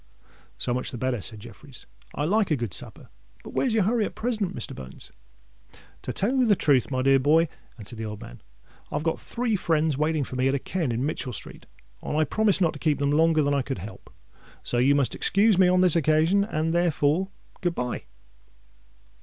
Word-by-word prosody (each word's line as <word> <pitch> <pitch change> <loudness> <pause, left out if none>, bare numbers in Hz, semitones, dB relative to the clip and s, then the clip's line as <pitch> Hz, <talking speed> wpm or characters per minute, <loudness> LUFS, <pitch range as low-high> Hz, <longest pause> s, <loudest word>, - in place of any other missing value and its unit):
"So 120 - -2
much 125 +1 -2
the 125 - -6
better," 125 -2 -1
said 110 +1 -6
Jeffreys: - - -13 0.3
"I 145 - -1
like 205 +4 +2
a 155 - +3
good 120 - -4
supper. - - -3 0.3
But - - -9
what's 260 - +1
your 215 - +3
hurry 225 +3 +1
at - - -7
present, 220 -6 -2
Mr. 115 - -4
Bones?" 65 0 -10 0.9
"To - - -4
tell 225 +7 0
you 255 -2 +3
the 205 - +5
truth, 140 -8 +2
my 130 -2 -1
dear 135 0 +5
boy," 155 +5 +4 0.3
answered 115 +1 -6
the 110 - -4
old 105 -1 -6
man, - - -11 0.5
"I - - -4
have - - -1
got 165 -1 -1
three 235 -2 -2
friends 160 -5 0
waiting 155 -1 +1
for 130 - -7
me 130 +1 +1
at 135 - +1
a - - -1
ken 165 -3 -2
in 120 +3 -1
Mitchell 140 -4 -3
Street; - - -7 0.3
and 150 - -3
I 155 - +4
promised 205 +5 +2
not 165 -3 +3
to 145 - -10
keep 155 -1 +1
them 140 0 0
longer 160 0 +3
than 145 0 +1
I 140 - +2
could 135 -1 -4
help. 100 +5 -10 0.5
So 120 - 0
you 135 +3 +4
must 140 -3 +1
excuse 200 -1 +2
me 185 - +6
on 180 0 +4
this 180 -3 +4
occasion; 160 +5 +3
and, 165 -5 -1
therefore, 170 +1 +1 0.3
good 175 -2 -1
bye." 125 0 -3
155 Hz, 215 wpm, -25 LUFS, 130-185 Hz, 0.9 s, me